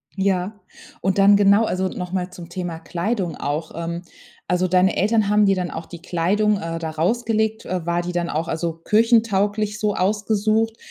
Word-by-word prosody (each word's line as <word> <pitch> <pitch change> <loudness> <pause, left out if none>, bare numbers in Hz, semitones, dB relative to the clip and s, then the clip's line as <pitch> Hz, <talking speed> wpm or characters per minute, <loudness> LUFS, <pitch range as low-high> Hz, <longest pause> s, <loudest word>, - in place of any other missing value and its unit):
Ja. 190 0 0 0.5
Und 190 +1 0
dann 200 +1 +6
genau, 200 +2 +5
also, 190 -2 -1
noch 180 -1 -6
mal 185 -1 -2
zum 175 -1 -10
Thema 175 -2 -5
Kleidung 180 -1 -2
auch, 155 +3 -3
ähm. 170 +1 -4 0.5
Also, 180 0 +1
deine 185 +1 +3
Eltern 215 +1 +2
haben 210 0 +4
dir 195 -1 +3
dann 180 -1 -2
auch 160 - -6
die 170 -2 -10
Kleidung, 195 +5 +1
äh, 165 -2 -4
da 160 -1 -4
rausgelegt. 220 +6 0
Äh, 180 -2 -3
war 170 0 0
die 175 +1 -5
dann 175 -1 -1
auch 160 +2 -2
also 165 +1 -2
kirchentauglich 210 0 +2
so 210 -1 0
ausgesucht? 215 +3 0
190 Hz, 180 wpm, -22 LUFS, 170-210 Hz, 0.5 s, dann